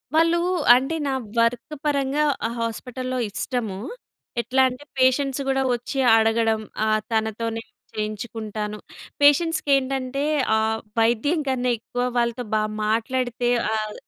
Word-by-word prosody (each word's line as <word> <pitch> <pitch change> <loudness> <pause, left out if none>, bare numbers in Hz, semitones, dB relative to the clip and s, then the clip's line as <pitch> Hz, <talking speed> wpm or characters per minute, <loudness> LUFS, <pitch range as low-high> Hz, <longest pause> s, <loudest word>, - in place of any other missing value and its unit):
వాళ్ళు 330 +1 +4 0.4
అంటే 270 +6 0
నా 270 - 0 0.3
వర్క్ 240 +6 0
పరంగా 280 0 +1 0.2
ఆ - - -4
హాస్పిటల్‌లో 255 +3 -4
ఇష్టము. 220 -2 -3 0.6
ఎట్లా 260 +2 +1
అంటే 255 +3 -9 0.2
పేషెంట్స్ 265 +1 +2
కూడా 270 0 +2
వచ్చి 245 +3 -5 0.2
అడగడం. 225 0 +2 0.2
ఆహ్, 215 0 +2
తనతోనే 225 +1 -1 0.3
చేయించుకుంటాను. 215 0 -4 0.4
పేషెంట్స్‌కి 295 +1 +4
ఏంటంటే 270 0 -2 0.3
ఆహ్, 220 0 0 0.2
వైద్యం 240 +8 +2
కన్నా 250 -2 +1
ఎక్కువ 245 +2 -3
వాళ్ళతో 235 +1 0
బా 215 - +3 0.2
మాట్లాడితే 240 +2 0 0.2
ఆహ్ 215 -1 -2
245 Hz, 115 wpm, -23 LUFS, 220-270 Hz, 0.6 s, వాళ్ళు